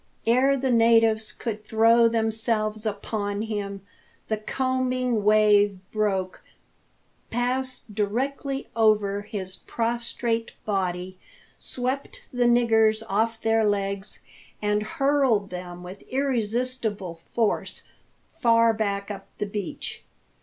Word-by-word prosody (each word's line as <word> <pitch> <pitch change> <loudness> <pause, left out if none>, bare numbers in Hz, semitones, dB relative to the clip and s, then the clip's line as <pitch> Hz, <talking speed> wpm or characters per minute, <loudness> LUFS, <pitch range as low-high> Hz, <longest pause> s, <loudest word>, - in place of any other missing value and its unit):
Ere 260 +4 +4
the 265 0 0
natives 225 -2 +4
could 215 -1 -5
throw 230 +2 +5
themselves 220 -1 0
upon 205 0 -3
him, 200 -3 -4 0.5
the 220 - +1
combing 255 0 0
wave 210 -1 +4
broke, 195 -4 -1 0.9
passed 255 +2 -1
directly 270 +7 -2
over 210 -3 +3
his 195 -3 -6
prostrate 230 0 -1
body, 185 -2 -2 0.4
swept 260 +2 -4
the 245 -1 +2
niggers 225 -2 +4
off 225 +3 +1
their 225 0 +2
legs, 200 -1 -2 0.4
and 210 0 +1
hurled 275 - +1
them 180 -1 -7
with 185 +2 -9
irresistible 240 -6 -1 0.2
force 225 -3 -1 0.6
far 230 -1 +4 0.3
up 195 -2 -7
the - - -1
beach. 200 -2 -5
220 Hz, 100 wpm, -25 LUFS, 205-240 Hz, 0.9 s, throw